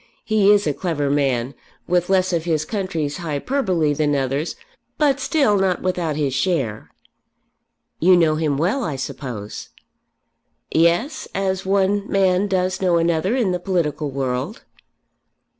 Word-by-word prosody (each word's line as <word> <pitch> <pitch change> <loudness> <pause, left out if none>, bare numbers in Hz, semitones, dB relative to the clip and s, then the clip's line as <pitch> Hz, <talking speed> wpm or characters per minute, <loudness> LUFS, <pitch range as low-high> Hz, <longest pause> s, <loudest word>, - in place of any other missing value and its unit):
He 215 -2 +3
is 205 -1 +4
a 150 - +1
clever 145 -4 -2
man, 135 -3 0 0.3
with 175 0 +1
less 185 -1 +2
of 165 -1 -1
his 155 -3 0
country's 165 -7 -3
hyperbole 170 - 0
than 145 0 +1
others; 140 +4 -1 0.4
but 285 -3 +2
still 270 - +2
not 190 -2 0
without 180 -4 -1
his 145 -3 -1
share." 135 - -1 1.1
"You 180 +2 +5
know 165 -3 +3
him 155 -3 0
well, 190 - 0
I 155 -9 -2
suppose." 125 -5 -6 1.0
"Yes; 170 - +1
as 190 -1 -1
one 200 +1 +1
man 190 0 +2
does 185 -1 -1
know 180 -2 +3
another 170 +6 +1
in 230 -8 +1
the 180 - -1
political 170 -5 -1
world." 135 - -3
175 Hz, 140 wpm, -21 LUFS, 145-195 Hz, 1.1 s, You